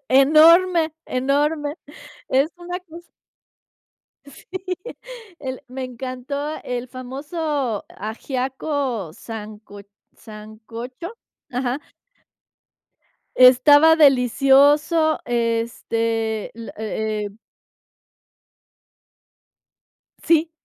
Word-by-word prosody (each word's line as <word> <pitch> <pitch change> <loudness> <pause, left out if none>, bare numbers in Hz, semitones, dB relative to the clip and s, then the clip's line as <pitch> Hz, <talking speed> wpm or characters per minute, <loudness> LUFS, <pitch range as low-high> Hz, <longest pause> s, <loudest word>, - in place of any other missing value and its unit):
Enorme. 320 +5 +6 0.2
Enorme. 290 +3 0 0.5
Es 275 +4 +2
una 355 +1 -5
cos 345 -1 -13 1.2
Sí. 280 -1 -16 0.9
El 260 -2 -6
me 260 +1 -5
encantó 260 +4 -5
el 250 0 -4
famoso 275 - -4
ajiaco 255 - -3
sanco 210 -1 -9 0.4
¿sancocho? 225 - -9 0.4
Ajá. 250 +1 -2 1.6
Estaba 290 +5 +7
delicioso, 285 +3 +4
este, 230 -1 -1
la 230 0 -9
e 215 -1 -3
eh 200 - -11 2.9
Sí. 325 0 +3
260 Hz, 65 wpm, -21 LUFS, 230-300 Hz, 2.9 s, Estaba